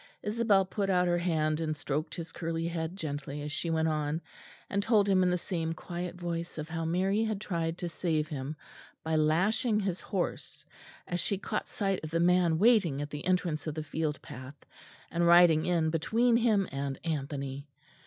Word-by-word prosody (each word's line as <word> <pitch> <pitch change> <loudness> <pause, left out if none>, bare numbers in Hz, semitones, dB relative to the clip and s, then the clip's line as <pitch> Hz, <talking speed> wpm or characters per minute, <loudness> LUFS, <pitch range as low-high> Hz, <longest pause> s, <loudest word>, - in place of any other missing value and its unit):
Isabel 210 -3 +3
put 195 +1 -2
out 180 -1 +3
her 175 0 +2
hand 155 -3 +1
and 155 -2 -2
stroked 145 +2 -3
his 165 -2 -6
curly 165 0 -2
head 165 +1 -3
gently 145 -4 -4
as 150 - -4
she 165 +3 -2
went 160 0 +1
on, 155 0 0 0.5
and 200 - 0
told 205 -1 +3
him 190 -2 +4
in 180 - +3
the 180 - +2
same 165 -2 -2
quiet 175 +1 -5
voice 170 -1 -4
of 155 +1 -5
how 165 0 -3
Mary 190 +6 +1
had 215 -2 -2
tried 170 -5 -2
to 175 - -3
save 160 -2 -1
him 145 0 -4 0.5
by 160 0 0
lashing 190 +9 +2
his 190 -3 -2
horse, 190 -4 -4 0.4
as 175 - -2
she 200 - 0
caught 210 +2 -3
sight 195 -4 -1
of 155 - -4
the 165 +1 0
man 175 -1 +4
waiting 195 - +4
at 145 0 -4
the 145 -1 -6
entrance 175 -5 0
of 155 - -3
the 155 - -3
field 155 -1 -2
path, 130 +3 -9 0.6
and 170 +1 +2
riding 170 -2 +6
in 165 -3 +2
between 230 +9 +2
him 220 -5 +3
and 135 0 -3
Anthony. 140 -3 -3
170 Hz, 190 wpm, -30 LUFS, 155-185 Hz, 0.6 s, riding